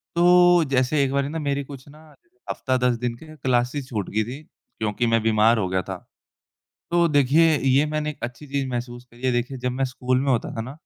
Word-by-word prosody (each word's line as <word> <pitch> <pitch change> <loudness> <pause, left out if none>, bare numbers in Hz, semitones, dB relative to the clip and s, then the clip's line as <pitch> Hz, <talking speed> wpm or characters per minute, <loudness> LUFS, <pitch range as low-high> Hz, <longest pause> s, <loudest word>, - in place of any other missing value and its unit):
तो 175 0 +5
जैसे 130 +3 +2
एक 135 - -1
बारी 140 0 0
ना 160 +1 -4
मेरी 140 -1 -1
कुछ 135 0 -11
ना 155 +2 -17
जैसे 355 +3 -39
हफ़्ता 130 -1 -1
10 125 -1 +1
दिन 120 0 -3
की 160 - -14
क्लासेस 130 0 -1
छूट 105 -6 -4
गई 110 +1 0
थीं 130 +7 -8 0.4
क्योंकि 110 +2 -1
मैं 115 -1 +2
बीमार 110 +1 +4
हो 95 -4 0
गया 95 0 0
था, 95 0 -6 0.9
तो 170 0 +3
देखिए 150 +2 +4
ये 135 +2 +2
मैंने 150 0 -2
एक 150 - -8
अच्छी 125 +5 -6
चीज़ 140 -1 -2
महसूस 120 0 -5
करी 120 0 -20
है, 130 - +2
देखिए 125 +2 -2
जब 125 0 -2
मैं 135 +2 -1
स्कूल 130 0 -1
में 135 -1 +1
होता 120 - -1
था 115 - -3
ना, 125 +4 -7
130 Hz, 225 wpm, -23 LUFS, 120-150 Hz, 0.9 s, तो